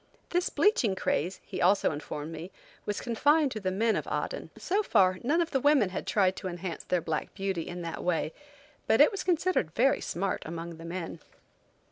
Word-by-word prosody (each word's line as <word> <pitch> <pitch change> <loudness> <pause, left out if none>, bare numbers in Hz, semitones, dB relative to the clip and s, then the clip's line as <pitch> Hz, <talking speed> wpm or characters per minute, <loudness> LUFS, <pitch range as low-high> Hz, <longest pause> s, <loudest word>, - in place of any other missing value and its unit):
This 355 +1 +1
bleaching 250 - +2
craze, 185 0 -1
he - - -5
also 195 +3 +4
informed 150 +1 -5
me, 165 +2 -7 0.4
was 205 - -1
confined 290 +5 +2
to 220 - -4
the 190 -2 -1
men 220 +4 +1
of - - -3
Aden. - - -3
So 400 +4 0
far, 185 - +3
none 305 +8 +2
of 335 - -2
the 270 - +2
women 275 -7 +4
had 185 - -5
tried 190 -3 +3
to - - -4
enhance 175 -1 -5
their 180 -1 0
black 155 -1 -3
beauty 195 -4 -2
in 175 0 -6
that 165 -1 -5
way, 165 -2 0 0.5
but - - +4
it - - +7
was 395 -2 -4
considered 345 - +1
very 270 +3 +3
smart 190 +2 -2
among 165 +1 -6
the 165 - -10
men. 170 -1 -5
190 Hz, 195 wpm, -29 LUFS, 170-270 Hz, 0.5 s, it